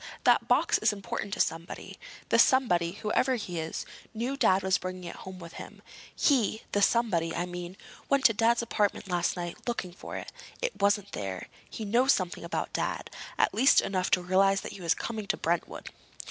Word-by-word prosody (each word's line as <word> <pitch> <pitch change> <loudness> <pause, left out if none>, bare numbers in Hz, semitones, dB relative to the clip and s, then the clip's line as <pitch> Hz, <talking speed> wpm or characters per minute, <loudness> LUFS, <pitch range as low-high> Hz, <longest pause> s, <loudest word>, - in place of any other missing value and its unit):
That - - +4
box - - +3
is - - +3
important 200 0 -5
to - - -10
somebody. 165 +1 -3 0.3
The - - +4
somebody, 180 -11 +4
whoever 240 +6 +1
he 180 -7 -4
is, 160 0 -4 0.3
knew 245 +5 -2
Dad 195 -9 +3
was 190 0 +2
bringing 185 0 -6
it 170 - -7
home 190 0 -9
with 170 -2 -10
him. - - -12 0.3
He—the 220 -6 +1
somebody, 195 -7 +2
I 175 - -1
mean—went 180 +10 -4
to 225 - +7
Dad's 230 +2 +2
apartment 210 -2 0
last 175 0 0
night 175 +4 -6
looking 190 -7 -3
for - - -7
it. - - -7 0.3
It - - -3
wasn't 200 0 +2
there. 95 -2 -5 0.2
He 220 - -6
knows 245 +6 +4
something 180 -3 -3
about 170 - -3
Dad—at - - -2
least 260 +6 +6
enough 185 -2 -1
to 180 - +3
realize 195 +2 +3
that - - -7
he 195 - -10
was 170 -1 +2
coming 220 -3 -5
to - - 0
Brentwood. 170 +1 -2
195 Hz, 180 wpm, -29 LUFS, 175-230 Hz, 0.3 s, to